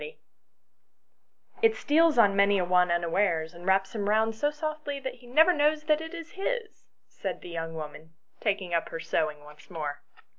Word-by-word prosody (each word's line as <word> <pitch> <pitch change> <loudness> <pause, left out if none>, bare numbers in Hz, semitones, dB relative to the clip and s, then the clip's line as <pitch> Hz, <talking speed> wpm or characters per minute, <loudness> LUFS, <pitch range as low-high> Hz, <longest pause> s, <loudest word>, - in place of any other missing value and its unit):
[STORY 475 +1 -9 1.4
"It 450 0 +4
steals 320 0 +3
on 205 -4 +5
many 200 0 +4
a 180 - +1
one 180 0 +3
unawares 170 -1 0
and 175 +2 -11
wraps 190 0 +2
him 205 -2 -2
round 220 +1 +2
so 290 +6 +1
softly 300 -1 -4
he 260 -2 -7
never 320 +8 +5
knows 300 0 +2
that 305 0 +2
it 320 +1 -7
is 335 0 -8
his! 445 +3 -4
" - - -53
said - - -4
the - - -9
young 165 -1 -5
woman, 155 +1 -9 0.2
taking 195 -5 -1
up 170 - 0
her 165 - -5
sewing 150 -2 -2
once 150 0 -16
more. 150 -5 -5
205 Hz, 185 wpm, -28 LUFS, -, 1.4 s, on